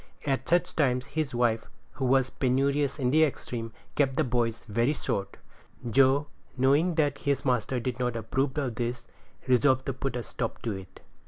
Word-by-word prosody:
At 135 -2 -1
such 175 0 +2
times 125 -4 +2
his 140 -3 -3
wife, 115 -2 +1 0.2
who 135 - -3
was 130 0 +3
penurious 140 +2 +1
in 125 -3 +1
the 155 +2 +5
extreme, 120 -6 -3 0.2
kept 135 -2 +1
the 155 - +4
boys 120 -3 -1
very 115 +6 +1
short. 100 -8 -3 0.5
Joe, 135 +4 +4 0.3
knowing 145 +7 +3
that 145 -3 +1
his 140 0 -1
master 125 0 +1
did 125 +1 -3
not 125 -1 0
approve 130 +5 -1
of 135 -5 -1
this, 120 +1 -3 0.4
resolved 130 +1 +3
to 135 - -1
put 135 0 -3
a 120 - -3
stop 115 0 -4
to 115 - -1
it. 95 -2 -9
130 Hz, 175 wpm, -28 LUFS, 120-140 Hz, 0.5 s, the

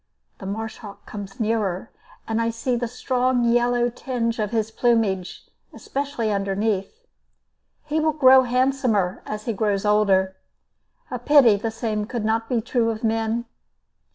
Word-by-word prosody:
The 195 - -7
marsh 220 +2 -4
hawk 205 -2 -11
comes 200 -2 -8
nearer, 215 -3 -1 0.4
and 225 0 0
I 230 - +1
see 230 +2 -2
the 240 0 -2
strong 250 +1 0
yellow 240 0 +2
tinge 240 -1 -3
of 210 -1 0
his 220 -1 -1
plumage, 220 -6 0 0.3
especially 275 -6 -3
underneath. 200 - -2 0.8
He 305 +1 -1
will 315 0 +2
grow 265 -3 +7
handsomer 250 -6 +1
as 210 0 -5
he 230 - -1
grows 205 -1 0
older. 195 -3 +2 0.7
A - - -3
pity 280 -8 +6
the 215 +3 -2
same 220 -2 -3
could 235 -3 -3
not 225 +1 0
be 240 -3 +1
true 230 0 0
of 225 0 -4
men. 225 +1 0
225 Hz, 150 wpm, -23 LUFS, 210-245 Hz, 0.8 s, grow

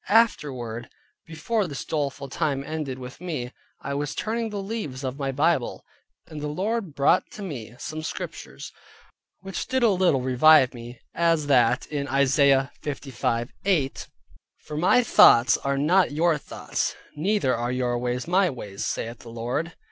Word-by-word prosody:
Afterward, 130 - +1 0.4
before 180 +6 -1
this 140 -4 -6
doleful 145 -2 -2
time 135 0 -1
ended 150 -3 -4
with 125 +4 -10
me, 150 -9 -4 0.3
I 140 - -3
was 145 +1 -3
turning 225 +1 -2
the 210 - -5
leaves 195 - -5
of 130 +2 -4
my 135 -1 -1
Bible, 145 -1 0 0.4
and 155 -2 -8
the 150 - -3
Lord 190 +2 -2
brought 140 +6 +3
to 210 - -7
me 120 - -7
some 155 +4 -6
Scriptures, 155 - -7 0.7
which 195 0 -5
did 260 -1 0
a 230 - +6
little 180 -8 +2
revive 130 +1 +5
me, 120 0 -10
as 165 -2 +2
that 125 -4 +3
[in] 140 -2 -2
Isaiah 135 0 +3
55.8: 135 - -2 0.5
"For 150 - -9
my 180 +10 +4
thoughts 120 - +6
are 140 0 -1
not 170 +5 +3
your 160 +1 +2
thoughts, - - -3 0.2
neither 165 -4 +1
are 120 +1 -2
your 125 -1 0
ways 125 +2 -2
my 185 +1 +3
ways, 105 -7 -6
saith 115 +1 -3
the 120 - -12
Lord." 120 +9 -3
145 Hz, 155 wpm, -25 LUFS, 125-170 Hz, 0.7 s, a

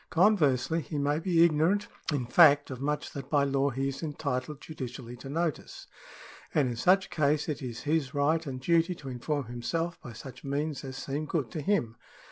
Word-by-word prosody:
Conversely 165 - +3
he 150 - -5
may 145 +1 +1
be 170 -1 +4
ignorant 170 +6 +2 0.2
in 140 -5 -1
fact 145 +2 +6
of 130 0 -6
much 150 +1 -2
that 135 -1 -7
by 145 -2 +3
law 140 0 +1
he 135 +1 -2
is 135 0 -6
entitled 145 -2 -3
judicially 125 -6 -7
to 135 +3 -9
notice, 165 +1 -3 0.7
and 145 -3 +4
in 120 - -3
such 190 +10 +4
a - - -17
case 150 -1 +1
it 150 -4 -3
is 120 -3 -5
his 150 -3 0
right 155 +3 +1
and 130 -2 -4
duty 170 +5 +2
to 140 -4 -9
inform 135 +3 -2
himself 165 +9 -3
by 120 - -9
such 125 +1 -10
means 145 +2 -2
as 135 -1 -6
seem 145 +2 -3
good 145 -8 -2
to 155 - -4
him. 130 - 0
145 Hz, 195 wpm, -29 LUFS, 130-160 Hz, 0.7 s, fact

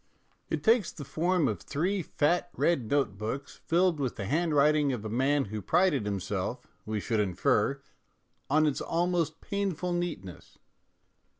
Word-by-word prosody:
It - - -2
takes 225 -3 +3
the 145 - -9
form 170 +2 +1
of 105 -7 -2
three 185 +6 -1
fat 170 +3 0
red 135 -10 +1
note 135 -9 0
books 135 +6 -5
filled 175 -1 +3
with 130 -4 -1
the 100 - -5
handwriting 150 - +3
of 115 -4 -4
a - - -3
man 135 +5 +2
who 105 - -3
prided 165 - +2
himself, 100 +4 -3 0.2
we 110 -1 -1
should 110 +2 -1
infer, 95 -5 +1 0.7
on 155 +3 +4
its 145 -3 0
almost 175 -1 0
painful 190 -4 -2
neatness. 160 - -5
145 Hz, 145 wpm, -29 LUFS, 110-175 Hz, 0.7 s, on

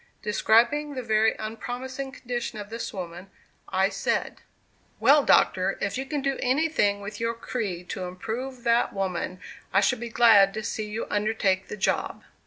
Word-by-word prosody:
Describing 240 +8 +2
the 255 - -4
very 220 -1 +3
unpromising 250 +5 -5
condition 240 -4 -4
of 205 0 -8
this 230 +1 -4
woman, 180 0 -7 0.4
I 190 +1 +2
said: - - -2 0.6
"Well, 280 +6 +6
Doctor, 190 -5 +3
if 200 0 -2
you 265 +1 -4
can 290 -1 -2
do 275 -1 -1
anything 255 -7 +1
with 200 +1 -7
your 230 0 -1
creed 200 -7 -4
to 185 - -4
improve 235 +8 -5
that 235 0 +2
woman, 185 -2 -3 0.3
I 195 - +4
should 220 +4 +2
be 240 0 -5
glad 215 -4 +6
to 220 - -4
see 215 -1 -3
you 215 +2 -3
undertake 205 -3 +1
the 210 - -6
job." 195 - -1
220 Hz, 165 wpm, -26 LUFS, 195-250 Hz, 0.6 s, Well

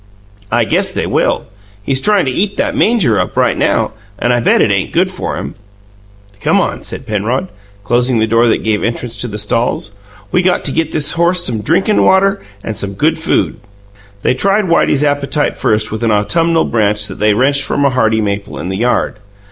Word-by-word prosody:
"I 120 +1 +2
guess 100 - +1
they - - -2
will. - - 0 0.4
He's 135 +3 0
tryin' 210 -1 +2
to 130 - -1
eat 200 +9 -1
that - - -1
manger 180 - +2
up - - -3
right - - +2
now, - - 0 0.3
and 120 +4 +1
I 120 - +2
bet 120 - +3
it 105 - +3
ain't 100 -1 -1
good 185 +2 +1
for 185 - -4
him." - - -6 0.9
"Come - - +2
on," - - -2
said - - -7
Penrod, 115 - -2 0.3
closing 120 +4 +1
the 110 - +2
door 115 +2 +2
that 115 - +1
gave 110 -1 0
entrance 115 0 -3
to 120 - -2
the 105 -2 -6
stalls. 105 -1 -1 0.4
"We 180 - +2
got 180 0 0
to - - 0
get 160 -1 -1
this 150 -2 +3
horse 175 +1 +2
some 115 -3 -2
drinkin' 175 - +2
water 195 +1 +3 0.2
and 110 - -4
some 100 0 -1
good 155 +11 0
food." 160 - 0 0.6
They - - +2
tried 200 +9 +1
Whitey's 165 -4 +2
appetite 145 +1 0
first 105 -1 0
with 110 - -4
an 115 - +1
autumnal 165 +11 +1
branch 105 -2 +1
that - - -6
they 105 0 +2
wrenched 140 +4 +2
from 140 +1 0
a 140 - +3
hardy 110 -3 +1
maple 100 -1 -3
in 85 - -5
the 95 - -3
yard. 120 -1 0
125 Hz, 205 wpm, -14 LUFS, 110-165 Hz, 0.9 s, bet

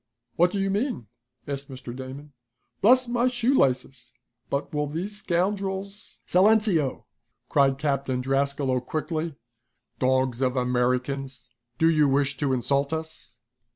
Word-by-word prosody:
"What 175 +2 +4
do 200 - -4
you 195 0 0
mean?" 205 - -1 0.4
asked 140 0 -4
Mr. 125 -2 -8
Damon. 135 +3 -9 0.5
"Bless 255 +4 +5
my 240 +1 +1
shoelaces, 135 - 0 0.3
but 140 +2 -2
will 150 0 0
these 180 +8 -4
scoundrels 195 +1 -2
" - - -46
"Silenceo!" 190 - +3 0.5
cried 140 -2 +4
Lieutenant 135 -2 -1
Drascalo 135 -1 +1
quickly. 160 0 -3 0.6
"Dogs 130 -1 +1
of 130 0 +1
Americans, 125 +1 -1 0.3
do 160 - +4
you 155 -3 +4
wish 140 +1 +1
to 145 -2 0
insult 140 +3 +1
us?" 160 -7 -6
140 Hz, 125 wpm, -26 LUFS, 130-185 Hz, 0.6 s, Bless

